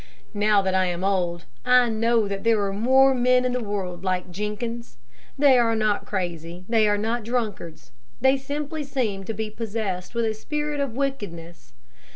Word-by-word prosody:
Now 205 -1 +3
that 190 -1 0
I 190 0 +3
am 175 +1 -3
old, 180 -3 0 0.2
I 250 -1 +5
know 225 -1 +2
that 200 -1 -4
there 225 -1 +3
are 195 - -2
more 265 +6 +4
men 250 0 +3
in 250 - +1
the 250 -1 -2
world 190 -4 -4
like 185 -1 -2
Jenkins. 210 - -5 0.4
They 275 -3 +6
are 230 -1 +2
not 215 -2 0
crazy, 175 -2 -4
they 225 -2 +3
are 205 - +2
not 225 +3 -1
drunkards; 210 - -4 0.3
they 265 +1 +4
simply 290 +3 -4
seem 230 -9 -2
to 225 - -3
be 215 +1 -4
possessed 210 -3 -4
with 235 -1 +1
a 220 - 0
spirit 295 +6 -3
of 275 -5 -2
wickedness. 170 - -5
220 Hz, 180 wpm, -24 LUFS, 190-250 Hz, 0.4 s, They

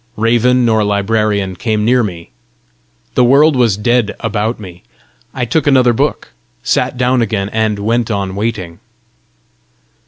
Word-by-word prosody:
Raven 120 +3 +2
nor 110 -2 +2
librarian 100 -1 0
came 105 +2 -1
near 125 +2 +3
me. 90 -6 -6 0.8
The 125 - +3
world 140 +5 +4
was 115 -6 +2
dead 120 +1 0
about 110 +2 -2
me. 90 -4 -11 0.5
I 125 -2 -3
took 155 +6 -1
another 130 -3 +4
book, 135 -1 -2 0.3
sat - - 0
down 125 0 +1
again, 105 -3 -2
and 110 -1 -1
went 115 +3 -1
on 100 -3 -2
waiting. 100 -6 -4
110 Hz, 135 wpm, -14 LUFS, 100-125 Hz, 0.8 s, world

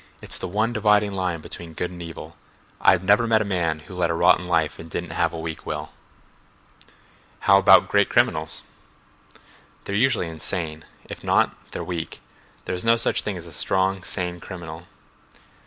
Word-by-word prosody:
"It's - - 0
the - - -4
one 110 +6 0
dividing 105 -2 +3
line 90 -4 -2
between 85 +1 -9
good 90 +2 -3
and 90 -1 -9
evil. 85 -1 -9 0.5
I've 95 -1 +5
never 105 +5 +4
met 110 -1 +3
a - - -8
man 85 -5 -1
who 80 - -12
led 90 -2 0
a 85 - 0
rotten 90 +2 +4
life 80 -4 +1
and 80 - -9
didn't 85 +1 -4
have 85 0 +1
a 85 - -6
weak 80 -1 -5
will." - - -5 1.5
"How 100 0 +6
about - - +7
great - - +3
criminals?" 80 +1 +1 1.2
"They're 100 - -5
usually 115 -4 +2
insane. 80 -1 -4 0.2
If - - -9
not, - - +2
they're - - -5
weak. 85 -3 -5 0.5
There - - -3
is 90 - -3
no 115 0 +5
such 115 - +1
thing 100 -3 -4
as 85 - -9
a 85 - -12
strong, 95 +3 +1
sane 90 0 -2
criminal." 85 -2 -9
90 Hz, 175 wpm, -23 LUFS, 85-100 Hz, 1.5 s, about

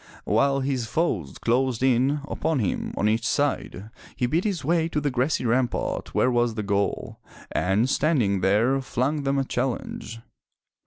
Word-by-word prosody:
While 140 0 +2
his 130 -3 -1
foes 105 - -1
closed 125 0 0
in 135 +3 +2
upon 160 0 -1
him 105 -8 -1
on 105 - +2
each 110 +1 +1
side, 115 -7 -1 0.2
he 125 - 0
beat 160 - 0
his 185 -10 -2
way 165 +1 +2
to 150 - -1
the 145 -1 -1
grassy 130 +2 0
rampart 120 +1 -1
where 130 - +3
was 120 -2 +1
the 110 - -2
goal, 100 0 -1 0.3
and 100 +6 +1
standing 130 - +1
there, 115 +8 +2
flung 135 +4 -1
them 140 0 0
a 135 - +2
challenge. 125 -3 -3
130 Hz, 160 wpm, -25 LUFS, 115-140 Hz, 0.3 s, where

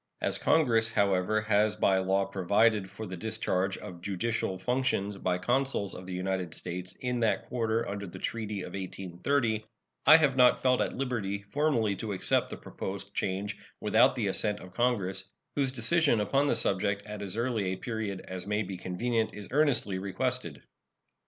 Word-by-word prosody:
As - - 0
Congress, 115 -8 +3
however, 100 0 +2
has 105 0 +2
by 95 -2 +3
law 95 +1 +1
provided 100 +2 +2
for 110 - -7
the 95 -2 -6
discharge 95 -1 -1
of 90 -1 -9
judicial 100 +1 -2
functions 125 -2 0
by 90 -1 0
consuls 125 -1 0
of 90 - -9
the 95 - -5
United 90 -2 -2
States 90 +1 -4
in 125 -1 -1
that 115 -2 +1
quarter 115 -2 0
under 100 0 -4
the 90 - -9
treaty 105 -1 -3
of - - -8
1830, 100 +5 -1 0.4
I 155 - +11
have 150 -5 +2
not 125 -1 +6
felt 130 -1 +3
at - - -1
liberty 105 -7 -2
formally 115 -3 +1
to 110 -3 -3
accept 95 - +1
the - - -6
proposed 100 +1 -6
change 100 +2 -2 0.2
without - - +4
the - - -1
assent 105 -1 0
of 90 0 -12
Congress, 95 -5 0 0.3
whose 135 -2 +2
decision 130 +1 +2
upon 135 +7 +2
the - - +2
subject 100 +1 0
at 105 -1 -7
as 100 +1 -4
early 115 -4 0
a 95 0 -1
period 110 -5 -4
as 95 0 -7
may 105 +1 0
be 95 -1 -6
convenient 110 +6 -1
is 105 -2 -8
earnestly 130 -10 +2
requested. 100 - -2
105 Hz, 170 wpm, -29 LUFS, 95-120 Hz, 0.4 s, I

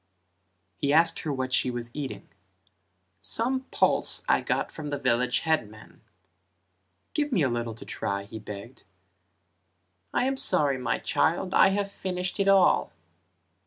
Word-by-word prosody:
He 140 - 0
asked 165 +2 +4
her 155 - -3
what 130 -2 -2
she 130 - +3
was 120 -1 -4
eating: 145 -3 -5 0.9
"Some 260 +3 0
pulse - - +2
I - - +3
got - - -1
from 150 -2 -6
the 145 - -2
village 125 -2 +1
headman," 110 -10 -3 1.1
"Give 295 -1 0
me 190 - +2
a 135 - +2
little 120 -1 -3
to - - -11
try" 100 0 -3
he 110 +2 -9
begged. 105 +3 -9 1.3
"I - - +1
am 270 0 0
sorry 140 - +1
my 125 - 0
child, 175 +3 0
I - - +7
have 200 +1 -1
finished 180 0 -4
it 195 - +2
all." 195 -2 +4
145 Hz, 145 wpm, -27 LUFS, 120-190 Hz, 1.3 s, I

